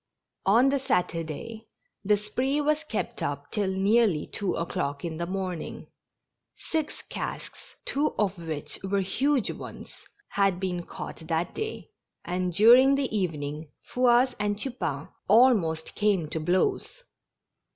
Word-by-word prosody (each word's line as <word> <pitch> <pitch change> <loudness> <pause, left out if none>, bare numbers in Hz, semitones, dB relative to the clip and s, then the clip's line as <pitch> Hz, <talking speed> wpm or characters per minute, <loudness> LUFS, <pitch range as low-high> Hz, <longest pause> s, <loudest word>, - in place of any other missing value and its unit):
On 235 +7 +6
the 280 0 +1
Saturday, 180 - -2 0.4
the 210 +1 +3
spree 255 +7 -1
was 305 +1 +1
kept 260 -8 -4
up 145 0 -3
till 205 -2 0
nearly 195 -3 +3
two 200 -2 -2
o'clock 165 -4 -3
in 160 -2 -4
the 170 +1 -3
morning. 185 -3 -5 0.7
Six 315 -2 -3
casks, - - -7
two 290 +2 0
of 200 -2 +1
which 160 -4 -5
were 195 +1 +1
huge 255 +7 +1
ones, - - -9 0.4
had 195 -3 +1
been 180 -2 -3
caught - - -7
that 165 +1 -1
day, 440 0 -5 0.3
and 180 +1 -1
during 240 +8 +7
the 270 -5 -1
evening 155 -5 -2 0.2
Fouasse 250 +1 +4
and 205 0 0
I'upain 220 - -3 0.2
almost 205 -9 +4
came 200 -6 +1
to 160 - -2
blows. 185 - 0
195 Hz, 130 wpm, -27 LUFS, 170-245 Hz, 0.7 s, during